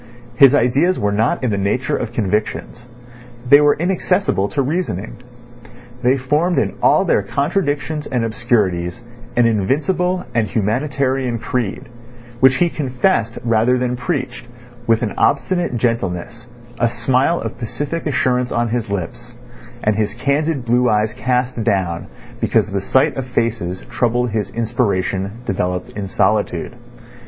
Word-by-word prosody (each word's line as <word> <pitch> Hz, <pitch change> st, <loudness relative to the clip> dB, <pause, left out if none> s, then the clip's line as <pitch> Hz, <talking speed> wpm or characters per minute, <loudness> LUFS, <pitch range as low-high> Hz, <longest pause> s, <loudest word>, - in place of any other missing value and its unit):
His 135 Hz, +2 st, +7 dB
ideas 145 Hz, +8 st, +2 dB
were 105 Hz, -, +1 dB
not 110 Hz, +5 st, 0 dB
in 125 Hz, -, +1 dB
the 100 Hz, -, -1 dB
nature 105 Hz, +6 st, 0 dB
of 115 Hz, -, -3 dB
convictions. 110 Hz, +2 st, -2 dB, 0.6 s
They 145 Hz, +3 st, +8 dB
were 145 Hz, 0 st, +4 dB
inaccessible 180 Hz, -, +1 dB
to 140 Hz, -2 st, 0 dB
reasoning. 130 Hz, -, -3 dB, 0.8 s
They 130 Hz, +2 st, +3 dB
formed 150 Hz, +7 st, +1 dB
in -, -, +1 dB
all -, -, +4 dB
their -, -, +3 dB
contradictions 150 Hz, -1 st, -1 dB
and 125 Hz, -4 st, -1 dB
obscurities 110 Hz, -4 st, 0 dB, 0.3 s
an 120 Hz, -, +4 dB
invincible 155 Hz, -, 0 dB
and 115 Hz, -2 st, +1 dB
humanitarian 130 Hz, +4 st, 0 dB
creed, 115 Hz, -2 st, -3 dB, 0.5 s
which 130 Hz, +1 st, +6 dB
he 175 Hz, +7 st, +3 dB
confessed 125 Hz, -, 0 dB
rather 115 Hz, +2 st, +2 dB
than 125 Hz, 0 st, -1 dB
preached, 125 Hz, 0 st, -3 dB, 0.4 s
with 115 Hz, 0 st, +3 dB
an 105 Hz, -, -2 dB
obstinate 175 Hz, -9 st, +1 dB
gentleness, 115 Hz, -1 st, -2 dB, 0.3 s
a 120 Hz, -, +3 dB
smile 130 Hz, +7 st, +1 dB
of -, -, -6 dB
pacific 145 Hz, +7 st, -4 dB
assurance 125 Hz, -3 st, +1 dB
on 120 Hz, 0 st, 0 dB
his 115 Hz, -2 st, -2 dB
lips, 120 Hz, +6 st, -5 dB, 0.5 s
and 105 Hz, 0 st, +2 dB
his 105 Hz, 0 st, -1 dB
candid 140 Hz, +2 st, 0 dB
blue 120 Hz, +1 st, +3 dB
eyes 105 Hz, 0 st, +1 dB
cast 125 Hz, 0 st, -1 dB
down 90 Hz, -5 st, -1 dB, 0.3 s
because 105 Hz, -, +1 dB
the 100 Hz, -1 st, -1 dB
sight 130 Hz, +6 st, +2 dB
of 130 Hz, -1 st, -3 dB
faces 105 Hz, -6 st, -1 dB
troubled 120 Hz, 0 st, 0 dB
his 105 Hz, -2 st, -2 dB
inspiration 105 Hz, -3 st, -1 dB
developed 90 Hz, -2 st, -2 dB
in 100 Hz, -1 st, -5 dB
solitude. 100 Hz, +2 st, 0 dB
120 Hz, 140 wpm, -19 LUFS, 110-135 Hz, 0.8 s, They